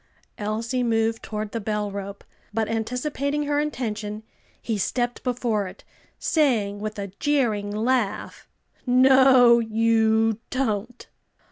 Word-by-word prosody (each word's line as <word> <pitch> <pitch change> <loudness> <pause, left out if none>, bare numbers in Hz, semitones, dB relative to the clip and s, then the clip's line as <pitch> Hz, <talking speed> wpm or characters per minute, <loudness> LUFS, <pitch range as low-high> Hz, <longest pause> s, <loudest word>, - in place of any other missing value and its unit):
Elsie 225 +4 -2
moved 225 -1 +1
toward 215 -1 -5
the 230 - -3
bell 210 -1 -2
rope, 200 0 -7 0.3
but 220 +1 -1
anticipating 275 +6 -2
her 290 0 0
intention, 220 -7 -3 0.4
he 225 - -3
stepped 240 +5 -2
before 235 -5 -1
it, - - -12 0.3
saying 225 - +1
with 215 +1 -5
a 200 -1 -4
jeering 235 -9 +1
laugh, 220 0 -1 0.4
"No, 255 -1 +6
you 225 -1 +2
don't!" 245 -3 -2
225 Hz, 115 wpm, -24 LUFS, 210-250 Hz, 0.4 s, No